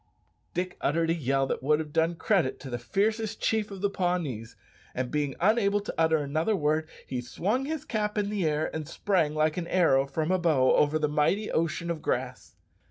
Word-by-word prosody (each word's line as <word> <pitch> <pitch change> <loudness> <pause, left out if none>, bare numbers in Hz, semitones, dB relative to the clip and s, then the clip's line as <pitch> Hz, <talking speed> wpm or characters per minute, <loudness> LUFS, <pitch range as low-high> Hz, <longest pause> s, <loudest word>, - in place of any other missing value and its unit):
Dick 180 +1 -2
uttered 165 +3 +1
a - - +3
yell 135 -4 +1
that - - -3
would 150 +3 +3
have 150 -1 -5
done 165 +1 +2
credit 170 -7 +1
to 135 - -8
the 120 - -3
fiercest 215 - -1
chief 220 -2 0
of 195 -2 -8
the 200 - +2
Pawnees, 170 - -2 0.4
and 125 -1 -2
being 145 -3 -1
unable 205 +1 +3
to 205 - -6
utter 160 -1 +3
another 155 +8 0
word, 155 -1 0 0.2
he 125 -2 -3
swung 205 - -1
his 315 0 -4
cap 210 -1 -2
in 205 0 0
the 205 -3 -1
air 155 0 0
and 155 -2 -4
sprang 165 -7 0
like 155 +1 +1
an 170 -2 -3
arrow 140 -8 +3
from 155 +5 -1
a 185 - +2
bow 150 -7 +3
over 150 +1 +3
the 155 -1 +1
mighty 150 +8 +1
ocean 165 +1 -1
of 160 -2 -4
grass. 125 0 -3
160 Hz, 205 wpm, -28 LUFS, 145-195 Hz, 0.4 s, a